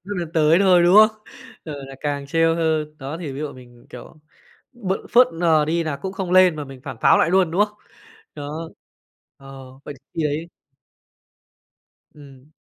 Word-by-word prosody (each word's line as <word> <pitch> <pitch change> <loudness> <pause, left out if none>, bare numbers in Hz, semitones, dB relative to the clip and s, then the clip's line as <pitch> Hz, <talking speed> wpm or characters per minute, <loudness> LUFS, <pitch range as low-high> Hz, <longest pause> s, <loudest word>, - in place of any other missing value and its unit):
nước 205 +1 -6
lấn 170 -2 -5
tới 160 0 +3
thôi, 185 -3 +4
đúng 175 +3 +5
không? 215 0 +6 0.5
Ờ, 155 - -6
là 135 - -11
càng 145 -1 -3
trêu 165 +2 +2
hơn, 155 -2 -1
đó 140 +3 -6
thì 150 -5 -6
ví 135 - -8
dụ 150 -2 -5
mình 125 -1 -15
mình, 120 - -21
kiểu, - - -12 0.6
b 210 -7 -4 0.2
phớt 245 +1 +6
lờ 165 -2 +2
đi 165 +2 -1
là 155 -3 -3
cũng 190 +5 -6
không 190 -2 -5
lên 185 -3 +5
mà 150 - -5
mình 135 -2 -12
phản - - -7
pháo - - +5
lại 165 - +2
luôn, 185 -2 +2
đúng 190 +5 +3
không? 210 0 -21 0.6
Đó, 155 +3 -7 0.7
ờ, 135 -1 -12 0.2
vậy 145 - -8 0.2
khi 165 - -2
ấy 150 +3 -3 1.7
Ừm. 140 -1 -17
160 Hz, 190 wpm, -21 LUFS, 145-180 Hz, 1.7 s, không